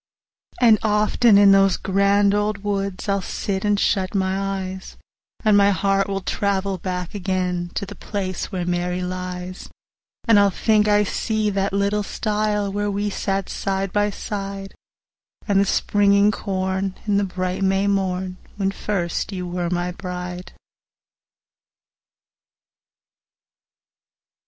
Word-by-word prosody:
And 225 -4 +6
often 210 +1 +3
in 200 -1 +7
those 195 -1 +4
grand 200 +1 +2
old 205 0 -1
woods 200 -2 -2
I'll 200 -1 +1
sit, 190 +1 -3
and 205 -1 +2
shut 190 -1 0
my 190 -1 +1 0.3
eyes, 190 0 -8 0.5
And 215 -1 +5
my 200 0 +5
heart 195 +1 +1
will 195 -1 -2
travel 195 -1 -1
back 180 -1 -4
again 180 -3 -2
To 200 - -2
the 200 - -9
place 190 -1 -4
where 180 -3 -2
Mary 180 +1 -1
lies; 180 0 -5
60 - - -11 0.6
And 225 -3 +6
I'll 200 0 +5
think 210 +2 +2
I 210 0 +4
see 215 +1 -1
the 195 0 0
little 200 +1 +1
stile 210 -1 -1
Where 205 0 -1
we 205 +1 -1
sat 195 -1 -2
side 195 -1 -2
by 205 0 +2
side: 195 -1 -5 0.7
And 200 -2 +3
the 200 - +3
springin' 200 +1 +3
corn, 190 -1 -2
and 205 -2 +2
the - - +1
bright 185 0 -3
May 195 +1 +2
morn, 190 -2 -1 0.2
When 195 -1 0
first 195 -2 -2
you 180 -2 -4
were 175 -1 -2
my 175 0 -1
bride. 180 -1 -6
195 Hz, 135 wpm, -22 LUFS, 185-205 Hz, 0.7 s, in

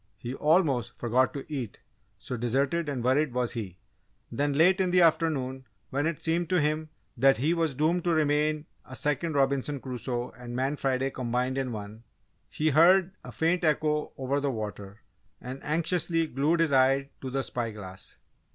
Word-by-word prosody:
He 120 +5 -6
almost 150 - +1
forgot 125 +2 +2
to 140 - -5
eat 130 -9 -5 0.4
so 125 - -6
deserted 135 +7 0
and 130 -4 -3
worried 130 +2 +2
was 125 -2 0
he. 100 -7 -6 0.5
Then, 145 +1 0
late 180 +6 +4
in 185 - +1
the 180 0 +5
afternoon, 135 -6 +1 0.2
when 145 +3 0
it 165 -3 -4
seemed 165 0 0
to 180 - +3
him 155 +1 0 0.3
that 135 +3 +4
he 150 +7 +1
was 165 -5 0
doomed 165 +5 +1
to - - +2
remain 150 0 +1 0.2
a 130 - -11
Second 150 +4 -1
Robinson 140 +1 +1
Crusoe 125 -1 -4
and 120 0 -9
Man 135 +3 0
Friday 135 -1 0
combined 125 +1 -1
in 130 -2 -2
one, 105 +1 -8 0.5
he 155 +1 0
heard 175 +5 +5
a - - -9
faint 170 +2 0
echo 150 -1 +1
over 135 +2 -1
the 140 0 -1
water, 105 -3 -6 0.4
and 130 +2 -8
anxiously 165 +1 0
glued 155 +4 +1
his 165 -3 +2
eye 135 +1 +3
to 130 - -4
the 135 +1 -1
spy 120 -3 -3
glass. 95 -3 -10
140 Hz, 175 wpm, -28 LUFS, 125-155 Hz, 0.5 s, the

